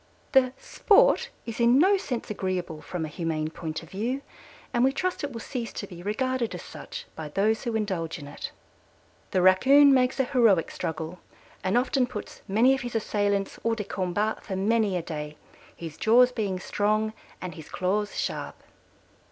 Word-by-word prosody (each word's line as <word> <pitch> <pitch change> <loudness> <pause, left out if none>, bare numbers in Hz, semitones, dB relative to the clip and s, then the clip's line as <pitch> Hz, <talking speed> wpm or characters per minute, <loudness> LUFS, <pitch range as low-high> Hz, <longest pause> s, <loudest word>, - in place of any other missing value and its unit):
The 260 -2 +5
"sport" 475 +3 +3 0.2
is 230 0 -6
in 235 +2 +5
no 380 +7 +5
sense 250 - -3
agreeable 180 -6 -3
from 175 -3 -4
a - - -4
humane 155 -1 -2
point 160 -1 -5
of 165 - -15
view, 245 +8 -2 0.5
and 240 - +3
we 265 - +4
trust 365 +4 -2
it 285 - -2
will 230 -2 -6
cease 240 -4 -4
to - - -5
be 175 -3 -10
regarded 235 +4 -1
as - - -7
such - - -8
by 155 -2 -6
those 210 +7 +1
who 235 -2 -1
indulge 185 -6 -2
in 145 - -9
it. 145 - -7 0.8
"The 185 - +1
Raccoon 270 +10 +7
makes 255 0 +2
a - - +5
heroic 230 - +3
struggle 160 +2 -4 0.4
and 190 +5 +2
often 255 0 +2
puts 210 -4 -8
many 230 +7 +4
of 270 - -1
his 245 -1 -5
assailants 205 -2 0
hors 230 0 +1
de 215 - -3
combat 200 +2 -2
for 195 - -4
many 205 0 +2
a 170 - -3
day, 150 -2 -6 0.4
his 165 -2 -8
jaws 245 +3 +5
being 205 -6 -2
strong 215 +3 0 0.3
and 180 -2 -6
his 155 -1 -11
claws 205 +3 -1
sharp." - - -3
210 Hz, 180 wpm, -27 LUFS, 180-245 Hz, 0.8 s, Raccoon